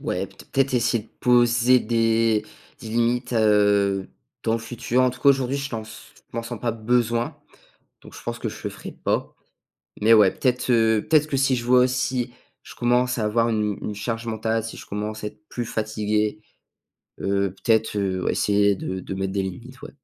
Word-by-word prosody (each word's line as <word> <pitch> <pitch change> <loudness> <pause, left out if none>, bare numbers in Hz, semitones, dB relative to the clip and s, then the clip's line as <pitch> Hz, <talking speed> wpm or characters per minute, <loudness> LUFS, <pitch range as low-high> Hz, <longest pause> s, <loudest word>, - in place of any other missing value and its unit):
ouais, - - -2
peut-être 135 -1 -2
essayer 115 -2 +1
de - - -24
poser 120 0 +4
des 115 -1 +2 0.4
des 115 - -8
limites, 120 +2 0
heu, 100 -3 +3 0.4
dans 110 - 0
le 115 - +1
futur, 120 +2 -1
en 130 - +4
tout 125 - -11
cas 140 - +6
aujourd'hui, 135 0 0
je 140 0 -4
pense 110 -1 -8 0.2
je - - -9
m'en 115 - -1
sens 115 -1 -7
pas 120 -2 -1
besoin, 120 +1 0 0.6
donc - - -15
je - - -11
pense - - -4
que - - -3
je - - -8
le - - -2
ferai - - -9
pas, - - -2 0.6
mais 110 +2 +6
ouais, 105 -4 +6
peut-être, 125 -1 -1
heu 110 -2 +3
peut-être 155 -1 +4
que 140 - -1
si 135 -1 +3
je 120 - -3
vois 125 0 +5
si 125 -1 -1 0.3
je - - -12
commence 125 +1 +1
à 110 - 0
avoir 115 +2 +2
une 105 -2 0
une 105 - -4
charge 115 +3 -4
mentale, 110 0 -1
si 115 - -7
je - - -11
commence 105 +1 -4
à - - -3
être 105 0 -21
plus 120 -2 -4
fatigué, 105 -1 -1 0.8
heu, 100 0 0
peut-être, 110 -2 +2
heu, 95 -2 -1
essayer 100 -1 +2
de 95 0 -4
de 95 - -6
mettre 95 0 -3
des 100 0 0
limites, 120 +8 -8
ouais. - - -8
115 Hz, 200 wpm, -23 LUFS, 105-125 Hz, 0.8 s, cas